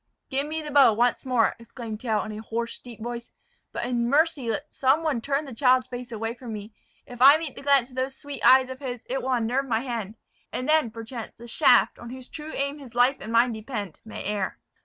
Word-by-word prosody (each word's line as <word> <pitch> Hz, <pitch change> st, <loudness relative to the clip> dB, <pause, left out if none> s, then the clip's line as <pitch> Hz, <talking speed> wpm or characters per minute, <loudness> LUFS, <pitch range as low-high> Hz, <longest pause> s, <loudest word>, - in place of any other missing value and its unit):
"Give 275 Hz, +2 st, 0 dB
me 315 Hz, +1 st, -3 dB
the 300 Hz, -, -6 dB
bow 275 Hz, -5 st, +7 dB
once 240 Hz, +4 st, +1 dB
more!" 245 Hz, -3 st, +2 dB
exclaimed 230 Hz, -2 st, -8 dB
Tell, 220 Hz, -4 st, 0 dB
in 215 Hz, -, -6 dB
a 215 Hz, 0 st, -6 dB
hoarse, 230 Hz, +1 st, -4 dB
deep 235 Hz, -3 st, -11 dB
voice; 240 Hz, 0 st, -5 dB, 0.4 s
"but -, -, -3 dB
in 240 Hz, -1 st, 0 dB
mercy 290 Hz, -3 st, +2 dB
let 285 Hz, +7 st, -3 dB
some 275 Hz, +5 st, +2 dB
one 295 Hz, -7 st, 0 dB
turn 280 Hz, +4 st, -1 dB
the 270 Hz, -, -8 dB
child's 255 Hz, +1 st, +4 dB
face 245 Hz, -1 st, -7 dB
away 225 Hz, 0 st, -3 dB
from 240 Hz, -2 st, -8 dB
me. 210 Hz, +1 st, -8 dB, 0.3 s
If 245 Hz, 0 st, -11 dB
I 280 Hz, +3 st, +9 dB
meet 315 Hz, -4 st, -5 dB
the -, -, -9 dB
glance 275 Hz, -3 st, +3 dB
of -, -, -14 dB
those 260 Hz, +1 st, -2 dB
sweet 285 Hz, -1 st, -7 dB
eyes 260 Hz, 0 st, +6 dB
of 260 Hz, -, -8 dB
his, 250 Hz, -4 st, -6 dB
it 265 Hz, +2 st, -2 dB
will 265 Hz, -, -2 dB
unnerve 250 Hz, +3 st, 0 dB
my 225 Hz, -2 st, +1 dB
hand; 230 Hz, -5 st, -4 dB, 0.4 s
and 255 Hz, -, -3 dB
then, 310 Hz, -5 st, +4 dB
perchance, 230 Hz, +1 st, -7 dB
the 235 Hz, -, -11 dB
shaft, 230 Hz, -, +4 dB
on 240 Hz, -, -9 dB
whose 255 Hz, 0 st, -9 dB
true 305 Hz, 0 st, -7 dB
aim 280 Hz, +2 st, -2 dB
his 250 Hz, -4 st, -12 dB
life 250 Hz, +3 st, +4 dB
and 220 Hz, -, -7 dB
mine 235 Hz, +2 st, +4 dB
depend, 215 Hz, -, -6 dB
may 220 Hz, -, -7 dB
err." 205 Hz, -2 st, -2 dB
245 Hz, 235 wpm, -26 LUFS, 230-275 Hz, 0.4 s, I